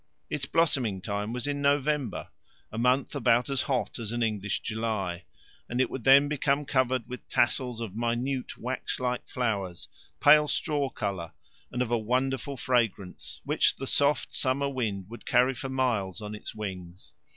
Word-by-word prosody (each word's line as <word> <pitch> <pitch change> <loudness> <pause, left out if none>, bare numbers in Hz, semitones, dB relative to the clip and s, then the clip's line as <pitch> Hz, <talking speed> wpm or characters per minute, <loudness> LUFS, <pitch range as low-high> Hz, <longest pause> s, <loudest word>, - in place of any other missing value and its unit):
Its - - -1
blossoming 130 - +1
time 100 +3 -3
was 125 0 -2
in 145 0 -1
November 140 -3 +1 0.4
a 110 - -6
month 125 +3 +2
about 125 -1 +2
as 135 - +2
hot 130 -3 -1
as 115 -2 -3
an 120 0 0
English 105 -3 -1
July 105 -6 -2 0.4
and 120 - -2
it 130 - +2
would 130 - -5
then 140 +2 +7
become 145 0 +1
covered 130 -3 +1
with 125 0 -8
tassels 125 -1 +1
of 115 -5 -5
minute 120 +3 -1
wax 125 +2 -3
like 125 -1 -2
flowers, 100 -8 -2 0.3
pale 150 +1 +7
straw 145 -1 0
colour, 95 -8 -4 0.4
and 125 0 0
of 120 - -5
a 120 - +3
wonderful 130 +4 -1
fragrance, 115 -7 -1
which - - +2
the 135 - -5
soft 145 +2 +1
summer 140 +1 +1
wind 105 -8 -2
would 120 +3 -10
carry 125 +2 +3
for 135 +2 -5
miles 120 -8 0
on 105 -1 -6
its 105 - -7
wings. 90 -6 -7
125 Hz, 165 wpm, -28 LUFS, 105-135 Hz, 0.4 s, then